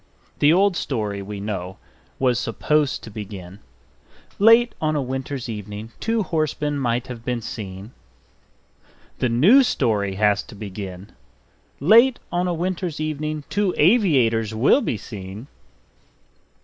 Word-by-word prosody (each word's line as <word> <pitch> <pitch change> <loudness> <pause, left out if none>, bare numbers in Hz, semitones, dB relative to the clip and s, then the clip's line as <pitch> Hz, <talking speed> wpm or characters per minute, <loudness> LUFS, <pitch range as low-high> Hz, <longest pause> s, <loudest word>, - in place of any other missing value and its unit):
The 145 - +5
old 190 +2 +3
story, 105 -10 -3
we 100 +1 -7
know, 95 -3 -5 0.4
was 125 -3 +1
supposed 150 +5 0
to 115 - -9
begin: 100 -3 -8 0.8
"Late 230 +3 +6
on 155 -1 +1
a - - +1
winter's 130 0 -4
evening 105 0 -7
two 225 -1 0
horsemen 150 -4 -1
might 120 -1 0
have 125 -3 -8
been 120 -2 -3
seen 100 -1 -7 0.6
." - - -33
The 125 - +1
new 170 - +6
story 105 - 0
has 105 0 +2
to - - -13
begin: 100 -2 -8 0.7
"Late 235 - +6
on 175 +1 0
a - - 0
winter's 175 -2 -3
evening 155 0 -3
two 205 -3 0
aviators 130 - +3
will 130 - +4
be 120 - -2
seen 100 +1 -9
125 Hz, 135 wpm, -22 LUFS, 105-160 Hz, 0.8 s, Late